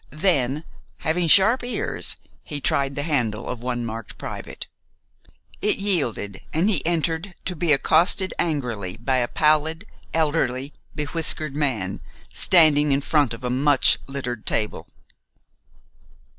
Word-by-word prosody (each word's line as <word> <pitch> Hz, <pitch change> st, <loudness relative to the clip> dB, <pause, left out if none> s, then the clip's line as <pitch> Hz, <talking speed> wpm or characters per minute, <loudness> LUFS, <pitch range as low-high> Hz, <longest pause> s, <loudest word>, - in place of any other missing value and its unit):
Then, 150 Hz, -3 st, 0 dB, 0.4 s
having 165 Hz, +2 st, 0 dB
sharp 210 Hz, -, +6 dB
ears, 245 Hz, -, -1 dB, 0.3 s
he 145 Hz, -3 st, -4 dB
tried 140 Hz, 0 st, 0 dB
the 145 Hz, -, -2 dB
handle 120 Hz, -8 st, -1 dB
of 125 Hz, -2 st, -5 dB
one 120 Hz, -1 st, -3 dB
marked 115 Hz, -1 st, -7 dB
"Private." -, -, -7 dB, 1.0 s
It 210 Hz, -, +2 dB
yielded, 140 Hz, -, -1 dB
and 165 Hz, +5 st, +1 dB
he 215 Hz, -, +2 dB
entered, 170 Hz, +2 st, -1 dB
to 180 Hz, -, -3 dB
be 165 Hz, 0 st, 0 dB
accosted 170 Hz, +6 st, +3 dB
angrily 120 Hz, -, -2 dB
by 130 Hz, +3 st, 0 dB
a 120 Hz, -1 st, +1 dB
pallid, 155 Hz, -, +1 dB, 0.3 s
elderly, 145 Hz, -4 st, 0 dB, 0.2 s
bewhiskered 155 Hz, -1 st, 0 dB
man, 120 Hz, -11 st, -1 dB, 0.3 s
standing 150 Hz, -4 st, +5 dB
in 140 Hz, +1 st, +2 dB
front 145 Hz, -3 st, +2 dB
of 115 Hz, -, -15 dB
a 125 Hz, -, -1 dB
much 140 Hz, +2 st, +4 dB
littered 125 Hz, -4 st, -5 dB
table. 105 Hz, -7 st, -2 dB
145 Hz, 130 wpm, -23 LUFS, 125-165 Hz, 1.0 s, sharp